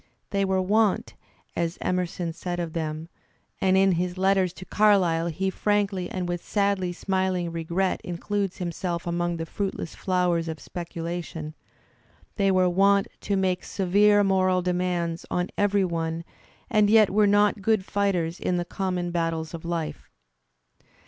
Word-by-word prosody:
They 200 -1 +1
were 190 0 +1
wont, 210 +1 +2 0.4
as 170 0 -1
Emerson 180 -2 -2
said 175 +1 -4
of 170 -2 -3
them 155 -1 -3 0.5
(and 190 0 +3
in 195 0 +5
his 180 +1 -1
letters 190 -1 +2
to 185 - -10
Carlyle 185 -6 +3
he 190 +4 -1
frankly 200 -3 0
and 185 -1 -3
with 175 -1 -3
sadly 200 -3 0
smiling 185 -1 -1
regret 170 +3 -1
includes 195 +2 -2
himself 175 0 -3
among 175 0 -1
the 165 - -3
fruitless 195 -2 -4
flowers 180 -3 0
of 160 -1 -5
speculation) 170 -2 -6 0.4
— - - -33
they 195 -2 +3
were 185 -1 +4
wont 195 +2 +3
to 200 - -1
make 185 -1 0
severe 205 +2 +3
moral 185 -2 +2
demands 175 -2 -1
on 180 0 -1
every 205 -1 +2
one 165 -1 -2 0.4
and 215 -4 +3
yet 215 -2 +6
were 210 +1 +4
not 205 0 +3
good 215 -1 +2
fighters 185 -5 0
in 180 - 0
the 175 - -1
conunon 180 -1 -2
battles 165 -1 -2
of 165 - -7
life. 170 -2 -4
180 Hz, 150 wpm, -26 LUFS, 170-195 Hz, 0.5 s, yet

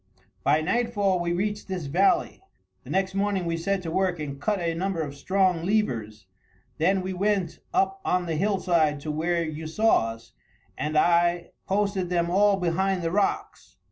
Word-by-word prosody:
"By 150 +2 +3
nightfall 205 -1 +1
we 175 0 -1
reached 205 +4 -2
this 185 -5 -4
valley. 180 - +1 0.4
The - - -13
next 190 0 0
morning 195 -2 0
we 165 0 -1
set 185 +3 -1
to 165 - -4
work 185 -1 0
and 140 -2 -6
cut 205 +6 0
a 170 -1 -1
number 185 +1 -2
of 140 -2 -6
strong 185 +2 +1
levers, 115 - -1 0.5
then 185 +4 +2
we 190 0 -3
went 195 -2 -1
up 385 +1 0
on 180 - 0
the 165 -2 -2
hillside 170 -5 +1
to 155 - -4
where 170 +3 0
you 155 0 -5
saw 215 - +2
us, 115 +1 -17 0.4
and 155 +1 -2
I 170 +1 +2 0.2
posted 195 -2 0
them 170 -1 0
all 200 +1 +4
behind 185 +1 0
the 165 - -1
rocks. 200 +2 -2
180 Hz, 170 wpm, -26 LUFS, 165-195 Hz, 0.5 s, all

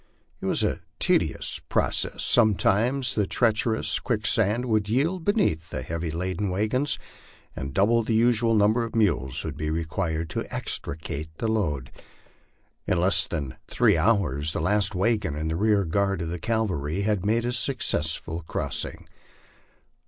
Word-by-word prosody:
It - - -3
was - - +1
a - - 0 0.2
tedious - - 0
process; - - 0
sometimes 120 +4 +2
the 105 -3 0
treacher 115 -2 +2
ous - - +1
quicksand 110 +1 +1
would 110 -4 0
yield 160 - 0
beneath 160 - +1
the 65 - -4
heavily 85 +3 -4
laden 90 +4 -2
wagons, 110 +9 0 0.6
and 70 0 -5
double 110 - +3
the 110 0 -1
usual 115 0 +3
number 110 +3 +3
of 115 - -6
mules 75 - +2
would - - -4
be 75 - -3
required 80 0 -2
to - - -4
extricate 75 +1 -4
the 115 - -2
load. 80 - -1 1.0
In 90 - +1
less 95 +3 +4
than 70 -6 -4
three - - +3
hours 80 - +1
the - - -2
last 100 +5 +1
wagon 100 -5 0
and 80 +1 -2
the - - -1
rear 105 +1 +2
guard 100 +1 0
of 80 - -4
the 85 +1 -4
cavalry 95 -6 -1
had 105 -3 0
made 115 +3 +1
a 120 - 0
suc 130 +3 -1
cessful 80 -2 -1
crossing. - - -4
100 Hz, 155 wpm, -25 LUFS, 80-115 Hz, 1.0 s, less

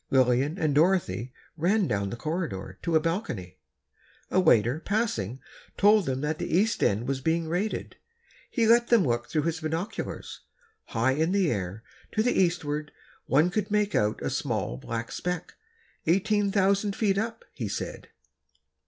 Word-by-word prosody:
Lillian 130 +4 +3
and 155 -5 +1
Dorothy 145 - +2 0.2
ran 185 +5 +2
down 100 -4 -1
the 100 - -4
corridor, 120 - -4
to 170 - 0
a - - +7
balcony. 155 - -3 0.7
A 185 - +3
waiter, 125 - +4
passing, 165 - -1 0.4
told 205 -2 +5
them 130 0 -1
that 150 +1 -2
the - - 0
East 220 +4 +1
End 105 +5 +1
was 135 -1 -1
being 160 +3 0
raided. 180 +7 -2 0.5
He 230 - +1
let 235 +1 +5
them 230 -7 +4
look 120 -1 -1
through 155 -2 0
his 165 0 -1
binoculars. 160 +5 -4 0.5
High 120 +3 +1
in 160 +6 +1
the 195 -5 +2
air, 100 0 -3 0.3
to 215 - +2
the 245 - +2
eastward, 150 -5 0 0.4
one 155 +6 +3
could 205 +1 -1
make 210 0 +1
out 105 +1 +1
a - - -1
small, - - -2
black 115 - -5
speck—eighteen 200 - -2
thousand 200 +1 +2
feet 200 -3 +1
up, 225 +1 -4
he 115 -5 -4
said. 100 - -5
160 Hz, 155 wpm, -27 LUFS, 125-200 Hz, 0.7 s, a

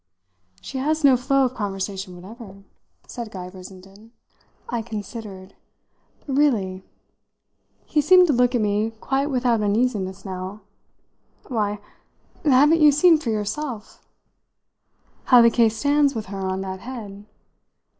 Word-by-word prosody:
"She 265 - -6
has 310 +3 -1
no 275 -2 +6
flow 270 +2 +2
of 255 - -2
conversation 195 -3 -5
whatever," 195 +1 -12 0.4
said 235 -3 -7
Guy 185 -3 -8
Brissenden. 195 +4 -14 0.5
I 235 -1 -2
considered. 205 -3 -8 0.7
"Really?" 240 -10 0 1.0
He 300 - +1
seemed 365 +4 +6
to 310 - +1
look 250 0 +2
at 240 - +1
me 210 +2 0
quite 275 +4 -1
without 245 -5 +1
uneasiness 205 -3 -1
now. 190 +2 -6 0.9
"Why, 210 -4 -1 0.7
haven't 295 +3 +4
you 300 -1 +7
seen 320 +3 +5
for 265 - -4
yourself 215 +2 -4 0.6
?" - - -41
"How 250 - +7
the 235 - +5
case 225 -1 +2
stands 285 +1 +2
with 220 -2 -4
her 195 -1 -3
on 190 0 -3
that 190 -1 -6
head? 210 -4 -9
225 Hz, 130 wpm, -22 LUFS, 195-270 Hz, 1.0 s, you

